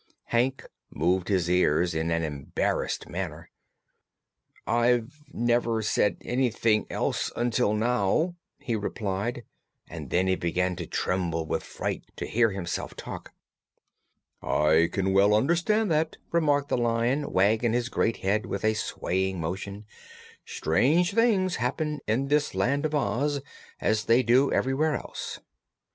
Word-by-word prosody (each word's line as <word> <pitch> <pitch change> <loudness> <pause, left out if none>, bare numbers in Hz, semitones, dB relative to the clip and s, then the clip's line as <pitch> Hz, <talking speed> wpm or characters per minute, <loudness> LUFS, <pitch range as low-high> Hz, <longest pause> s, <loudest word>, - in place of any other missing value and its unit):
Hank 125 +3 +1 0.2
moved 90 +4 0
his 95 -4 +1
ears 90 -1 +2
in 80 +1 -1
an 85 0 0
embarrassed 75 -3 -2
manner. - - -6 1.1
"I 120 0 +2
have 120 -2 +1 0.2
never 120 -2 +1
said 105 -3 +1
anything 115 -4 +1
else, - - -1
until 120 -2 +1
now," 120 - +1 0.2
he 115 - -3
replied; 105 +2 -3 0.4
and - - -8
then 90 +1 +2
he 95 0 +2
began 90 +1 -1
to - - -5
tremble 85 -3 -1
with - - -2
fright - - -4
to - - -4
hear 115 0 +2
himself 95 -3 -4
talk. - - -8 1.1
"I 80 +2 +3
can 95 0 0
well 100 +2 +5
understand 175 - +2
that," 155 +1 0
remarked 145 -4 +2
the - - +1
Lion, 120 +4 0
wagging 110 +5 +2
his 120 0 0
great 115 -2 0
head 105 +3 +1
with 100 - -3
a 110 - +3
swaying 95 -3 -2
motion. 100 +5 -5 0.6
"Strange 150 - +2
things 205 -5 +2
happen 150 +5 -2
in 120 +6 +1
this 145 -5 +1
Land 140 +10 +1
of 155 - -4
Oz, 140 +3 0 0.4
as 110 0 0
they 120 +3 +4
do 125 +4 +4
everywhere 145 +4 +1
else. - - -6
115 Hz, 135 wpm, -27 LUFS, 95-135 Hz, 1.1 s, well